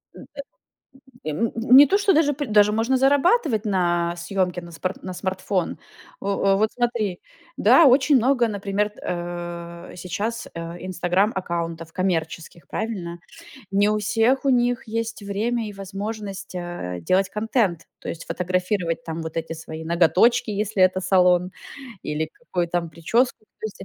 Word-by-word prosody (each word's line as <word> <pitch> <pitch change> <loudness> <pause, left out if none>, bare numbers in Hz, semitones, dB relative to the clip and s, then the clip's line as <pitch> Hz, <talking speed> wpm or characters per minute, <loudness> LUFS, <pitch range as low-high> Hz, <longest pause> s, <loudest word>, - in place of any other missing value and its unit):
М, - - -11
э. - - -13 1.0
И, - - -3
м, 225 +9 -1
не 255 +5 +7
то, 395 - +3
что 395 -2 +3
даже 295 -2 +3
п 290 +1 -3
даже 210 -2 +4
можно 230 +5 +1
зарабатывать 275 - +3
на 175 -3 +1
съемке 180 0 -1
на 170 0 -11
спар 185 +3 -3
на 185 - -5
смартфон. 185 -1 -2 0.4
О 195 - -6 0.3
о, - - +2
вот 215 +2 +1
смотри 235 -7 -1 0.4
Да, 335 - +6
очень 270 +2 +5
много, 245 0 +3
например, 205 +1 -1
э, 175 0 -6
сейчас, 205 +6 -4
э, 170 +2 -7
Инстаграм-аккаунтов 175 -3 -1
коммерческих, 170 -2 -3
правильно? 185 -6 -4 0.5
Не 200 +1 +3
у 215 0 +1
всех 225 +6 +1
у 275 - +3
них 245 -1 +1
есть 225 0 -3
время 220 +3 -2
и - - -7
возможность, 195 0 -6
э, 175 - -5
делать 185 - +2
контент, 210 -5 -1
то - - -9
есть, 170 - -5
фотографировать 180 -2 -1
там 165 0 -5
вот 160 -1 -7
эти 165 0 -3
свои 160 0 -8
ноготочки, 180 +8 +3
если 210 -1 -2
это 185 0 +4
салон, 180 -1 +3 0.5
или 155 +1 -2
какую 180 -7 -3
там 170 -1 -1
прическу. 215 - 0 0.2
То 220 - -2
есть 210 - -10
о - - -8
195 Hz, 155 wpm, -23 LUFS, 175-225 Hz, 1.0 s, не